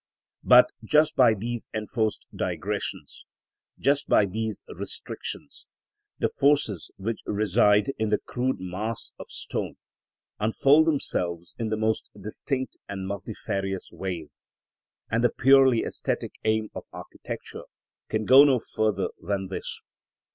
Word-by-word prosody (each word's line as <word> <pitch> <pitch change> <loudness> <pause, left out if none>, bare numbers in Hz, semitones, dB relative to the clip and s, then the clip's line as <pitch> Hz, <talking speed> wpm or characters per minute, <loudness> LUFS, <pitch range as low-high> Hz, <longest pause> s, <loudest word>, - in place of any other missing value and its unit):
But 125 0 +7
just 150 +7 +3
by 120 -4 +6
these 115 +3 -4
enforced 110 0 -1
digressions, - - -4 0.5
just 140 +1 +1
by 105 - +5
these 110 +2 -4
restrictions, - - -6 0.5
the - - +1
forces 140 - +1
which 110 +4 -3
reside 105 +4 +3
in 110 -1 +1
the 105 - +3
crude 125 -3 -2
mass 100 +5 -4
of - - -8
stone - - -4 0.6
unfold 140 +8 +4
themselves 90 - -1
in 115 -1 -1
the 110 - -1
most 110 0 0
distinct 130 +5 -3
and 95 -1 -4
multifarious 100 -1 -4
ways; 90 -5 -6 0.7
and 115 +1 +1
the 120 - +5
purely 135 -2 +5
æsthetic - - -3
aim 110 -1 +1
of - - -7
architecture - - -8 0.4
can 110 0 -1
go 130 +4 +9
no 140 -3 +5
further 110 -4 -1
than 95 -2 -2
this. 95 - -6
110 Hz, 125 wpm, -26 LUFS, 100-125 Hz, 0.7 s, go